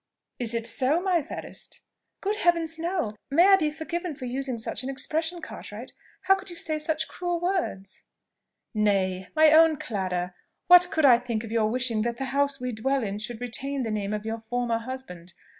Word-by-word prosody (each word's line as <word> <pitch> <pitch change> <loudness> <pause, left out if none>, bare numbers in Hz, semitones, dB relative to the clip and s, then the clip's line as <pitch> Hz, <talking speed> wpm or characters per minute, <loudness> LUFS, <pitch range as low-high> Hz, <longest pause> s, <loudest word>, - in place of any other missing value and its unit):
Is 235 -1 +1
it 230 -1 -2
so, 260 +7 +2
my 360 -2 +1
fairest?" - - -8 0.4
"Good 415 +2 -1
Heaven, 345 -4 +3
no! 335 - -1 0.2
May 330 +6 +5
I 390 - +9
be 310 -6 +1
forgiven 325 +2 -4
for 255 - -7
using 260 0 -3
such 220 -1 -3
an 260 - -5
expression, 320 +6 -2
Cartwright! - - -8 0.3
How 385 - +5
could 385 0 -4
you 345 - -7
say 310 -2 -2
such 310 0 -1
cruel 350 -1 -3
words?" 335 - -2 0.7
"Nay! 190 -3 +1
my 310 0 +6
own 320 0 +6
Clara! 185 -10 -3 0.3
what 360 0 +8
could 315 -4 +2
I 245 -3 +7
think 235 -3 -3
of 225 - -8
your 220 -2 +2
wishing 240 -2 0
that 235 +1 -2
the 270 - -3
house 280 0 +1
we 250 0 -3
dwell 265 +4 0
in 205 -1 -3
should 220 +1 -6
retain 265 +3 -2
the 225 - -2
name 205 -1 -2
of 210 0 -3
your 225 +1 -3
former 235 0 -1
husband? 225 -9 -8
260 Hz, 190 wpm, -26 LUFS, 225-320 Hz, 0.7 s, I